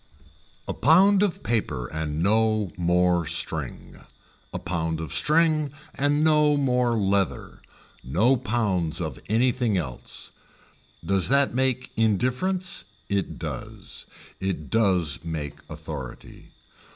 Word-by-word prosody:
A - - -2
pound 190 +6 +5
of 205 -4 0
paper 105 - -1
and 75 +2 -4
no 110 +1 +2
more 90 -1 +2
string, - - -3 0.5
a - - -4
pound 80 -2 -2
of 80 -4 -5
string 155 -2 +3 0.2
and 145 +2 +1
no 150 -2 +4
more 125 -3 +2
leather, 100 -3 -1 0.4
no 105 - +3
pounds 105 -10 -1
of 80 -6 -4
anything 115 -1 +2
else, 65 -9 -7 0.7
does 95 -1 +2
that 140 -1 +3
make 130 0 -1
indifference, 130 - 0 0.3
it 100 -2 -1
does, - - -8 0.3
it 95 -5 -3
does 90 - +1
make 80 -4 -5
authority. 70 -6 -9
110 Hz, 110 wpm, -25 LUFS, 85-130 Hz, 0.7 s, pound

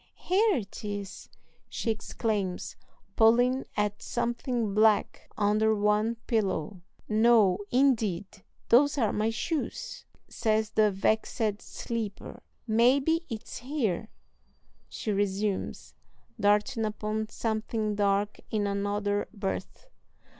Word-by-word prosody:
"Here 405 +3 +2
it 210 -6 -5
is," 205 -2 -6 0.4
she 230 - -1
exclaims, 210 -3 -3 0.4
pulling 245 +4 +4
at 210 0 0
something 240 -2 -2
black 215 0 +2
under 215 +1 +3
one 210 +2 +2
pillow. 195 -5 -1 0.3
"No, 215 -4 +4
indeed, 225 -8 +2 0.4
those 285 +5 +5
are 225 -6 +1
my 215 +1 +1
shoes," 280 +8 -4 0.2
says 220 -1 0
the 215 -1 +4
vexed 210 +1 0
sleeper. 225 -4 -5 0.2
"Maybe 270 +9 +3
it's 225 -3 -6
here," 235 - -2 0.8
she 215 - -3
resumes, 200 0 -2 0.5
darting 210 +4 +2
upon 215 0 -2
something 220 -1 -2
dark 205 0 +1
in 210 -2 0
another 205 0 -1
berth. 205 - -5
215 Hz, 100 wpm, -28 LUFS, 205-235 Hz, 0.8 s, those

